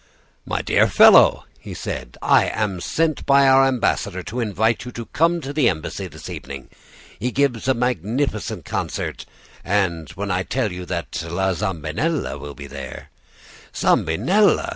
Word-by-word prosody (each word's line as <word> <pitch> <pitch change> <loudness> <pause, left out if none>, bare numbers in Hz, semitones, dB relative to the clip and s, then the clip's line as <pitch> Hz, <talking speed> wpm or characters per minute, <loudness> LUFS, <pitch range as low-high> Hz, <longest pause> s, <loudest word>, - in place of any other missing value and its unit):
"'My - - -2
dear - - +3
fellow,' - - +6
he - - -9
said, - - -6
I - - +4
am 100 -5 -2
sent 160 - 0
by 140 0 +5
our 135 0 +6
ambassador 100 -7 -1
to 120 +7 -5
invite 110 0 0
you 125 - -8
to 115 - -6
come 170 +6 +1
to 140 0 -6
the 145 -5 +3
embassy 80 -4 -4
this - - -11
evening. 70 -1 -8 0.5
He 120 +4 -1
gives 130 -3 0
a 130 - +3
magnificent 125 - -2
concert, - - -4 0.4
and 85 -5 0
when 100 +2 -4
I 90 +1 +1
tell 115 +2 -2
you 90 0 -7
that 85 -5 -4
La 95 +3 0
Zambinella 95 - -2
will 70 0 -8
be 70 - -9
there 70 -1 -9 0.3
' - - -22
"'Zambinella! 200 - +2
105 Hz, 160 wpm, -21 LUFS, 85-135 Hz, 0.5 s, fellow